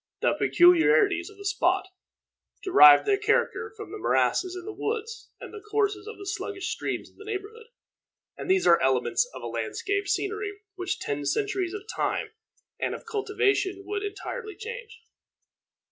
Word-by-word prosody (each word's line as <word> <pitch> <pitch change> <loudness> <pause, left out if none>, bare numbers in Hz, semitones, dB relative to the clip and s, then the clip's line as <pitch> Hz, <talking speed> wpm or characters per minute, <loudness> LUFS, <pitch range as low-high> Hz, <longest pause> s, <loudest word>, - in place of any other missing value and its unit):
The - - +3
peculiarities 355 +2 +4
of 415 - -16
the 400 - -11
spot 380 -1 +1 0.8
derived 150 - +8
their 400 -1 +2
character 445 +1 0
from 420 -5 -8
the 420 - -7
morasses 370 -2 +1
and 360 -1 -7
the 425 - -6
woods, 450 +1 -4
and - - -10
the 425 - -8
courses 415 -1 -1
of 445 - -8
the 395 - -9
sluggish 390 0 -4
streams - - -3
in - - -31
the - - -11
neighborhood, 430 +2 -6 0.7
and - - -7
these 375 0 +3
are 170 - +5
elements 130 - +1
of - - -10
landscape 405 0 -2
scenery 410 +2 -2 0.2
which 370 -1 -3
ten 145 0 -3
centuries 390 - -1
of 410 - -6
time 430 - -2 0.5
and - - -1
of - - -11
cultivation 405 -3 0
would 410 -1 -3
entirely 420 +2 -6
change. 445 0 -8
405 Hz, 160 wpm, -26 LUFS, 380-430 Hz, 0.8 s, derived